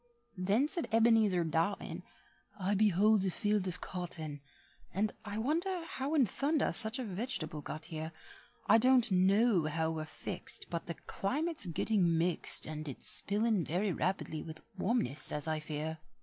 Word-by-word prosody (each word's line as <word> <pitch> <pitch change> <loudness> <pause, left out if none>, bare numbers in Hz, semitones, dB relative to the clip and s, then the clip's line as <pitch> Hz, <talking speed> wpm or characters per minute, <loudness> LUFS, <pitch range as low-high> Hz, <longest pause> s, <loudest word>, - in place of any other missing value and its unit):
Then 205 +10 +1
said 340 0 -3
Ebenezer 225 -5 +3
Dotton, 165 +5 -2 0.6
"I 195 +2 -1
behold 210 0 +3
a 190 - 0
field 205 0 -1
of 180 - -6
cotton, 160 -5 -5 0.5
And 205 +2 -1
I 205 -1 -6
wonder 335 - -1
how 285 -1 -4
in 275 -5 +4
thunder 285 - -1
such 220 +2 +3
a 260 - -4
veg'table 185 - -3
got 155 +2 -7
here. 160 0 -6 0.5
I - - +5
don't 250 -2 +3
know 190 0 +3
how 160 +1 -1
we're 155 -1 -4
fixed, 175 +3 -7
But 170 0 -4
the 170 - -5
climate's 295 - -3
getting 175 0 +1
mixed, 170 +1 +2
And 155 0 -7
it's 135 - +2
spilin' 210 -1 +6
very 185 +6 -1
rapidly 180 -3 -3
with 160 0 -10
warmness 185 - -1
as 150 +1 +4
I 155 -1 -1
fear." 155 +1 -5
195 Hz, 155 wpm, -32 LUFS, 160-225 Hz, 0.6 s, spilin